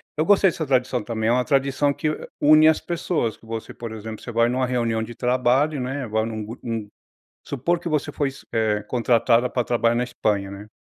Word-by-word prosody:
eu 155 - +1
gostei 200 -1 +5
dessa 160 -3 -4
tradição 125 -3 +1
também. 110 0 -2
É - - +4
uma 125 +1 +2
tradição 140 0 +2
que, 155 - -1
hã, 155 - -5
une 155 +1 +6
as 160 - +4
pessoas. 170 -8 -2
Você, 115 0 -7
por 115 -1 -7
exemplo, 110 0 -7
você 120 - -6
vai 115 +1 +3
numa 130 +1 0
reunião 115 -3 0
de 115 +1 -6
trabalho, 130 +5 +1
né? 135 +2 -3
Agora, 110 -2 -1
num 110 -2 -5
grupo, 115 +3 -9
num 110 -2 -3 0.6
supor 170 +6 -1
que 170 - -6
você 150 -3 -1
foi 145 -2 -1
s 135 - -13
eh, 105 -2 +1
contratada 120 +1 +2
pra 125 - -1
trabalhar 120 0 +1
na 120 - +1
Espanha, 105 -5 -1
né? 100 +2 -9
125 Hz, 215 wpm, -23 LUFS, 115-140 Hz, 0.6 s, une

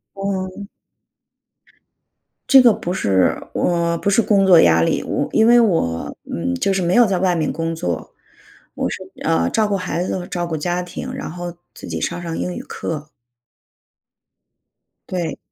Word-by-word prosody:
哦。 195 0 -4 1.8
这 270 -1 +8
个 245 -2 +6
不 175 - -4
是 95 - +2 0.2
我， 170 -1 0
不 200 - -1
是 200 +3 +4
工 200 -3 +3
作 180 -3 +7
压 85 0 +5
力。 - - +1
我 - - -2
因 220 0 +4
为 240 +1 +7
我， 165 - 0 0.2
嗯， 85 +1 -2
就 195 - 0
是 190 - 0
没 175 0 +1
有 240 - +7
在 195 -3 0
外 180 -1 +2
面 155 -3 0
工 165 0 -3
作， 90 - -4 0.6
我 - - -1
是， - - -4 0.3
呃， 85 +1 +1
照 215 - +1
顾 205 - 0
孩 180 -2 -2
子 185 - -2
和 175 - -7
照 175 -1 -3
顾 165 -2 -3
家 175 +3 -1
庭， 175 - -7
然 - - -5
后 175 +1 -6 0.2
自 - - -10
己 - - -4
上 175 - -3
上 165 -1 -4
英 180 - -3
语 - - -5
课。 155 -1 -6 2.0
对。 175 -4 -3
175 Hz, 185 characters per minute, -20 LUFS, 165-195 Hz, 2.0 s, 这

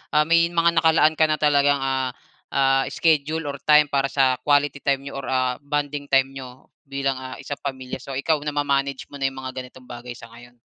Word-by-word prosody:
ah, 150 - +5
may 165 +2 +3
mga 170 -1 +2
nakalaan 160 -1 +4
ka 160 - +5
na 155 - +1
talagang, 145 -1 +3
ah 135 -2 -2 0.4
ah, 135 -1 +3
schedule 160 0 +1
or 140 - -9
time 150 -1 +5
para 135 -1 +1
sa 135 -2 +1
quality 145 0 +1
time 140 -1 0
niyo 140 0 -6
or 135 - -7
ah, 130 -1 0
bonding 145 0 -3
time 135 -1 +2
niyo 130 -1 -11 0.2
bilang, 135 -1 -2
ah, 130 0 -7
isang 145 - -7
pamilya 130 -2 -6
so 135 0 -8
ikaw 150 +3 +1
nama-manage 140 -2 -1
mo 145 - -9
na 135 - +1
yung 135 - -6
mga 130 0 -6
ganitong 130 0 -11
bagay 120 0 -9
sa 115 -2 -13
ngayon? 120 +1 -15
140 Hz, 205 wpm, -23 LUFS, 130-145 Hz, 0.4 s, ah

